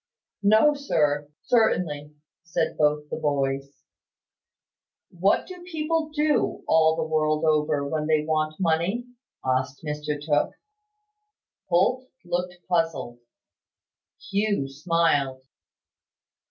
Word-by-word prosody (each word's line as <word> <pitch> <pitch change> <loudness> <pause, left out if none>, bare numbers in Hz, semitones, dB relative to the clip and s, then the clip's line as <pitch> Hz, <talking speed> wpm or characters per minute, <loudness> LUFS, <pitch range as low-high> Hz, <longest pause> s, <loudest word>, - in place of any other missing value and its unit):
"No, 220 +8 +5
sir, 150 - 0
certainly," 155 -11 +1 0.3
said 170 - -1
both 150 0 +1
the - - -2
boys. 140 -2 -2 1.3
"What 185 +3 +2
do 365 -1 -10
people 325 -2 -2
do, 300 0 +1
all 160 0 +4
the 160 - -1
world 155 0 +1
over, 150 -2 +1
when 155 +1 -2
they 155 -1 +2
want 155 0 -1
money?" 180 +7 0 0.4
asked 130 +3 -1
Mr 150 -1 -3
Tooke. 145 0 0 1.1
Holt 245 +9 +2 0.2
looked 180 0 -2
puzzled. 165 -9 -1 1.1
Hugh 200 -7 +1
smiled. 145 -3 0
160 Hz, 100 wpm, -25 LUFS, 150-190 Hz, 1.3 s, No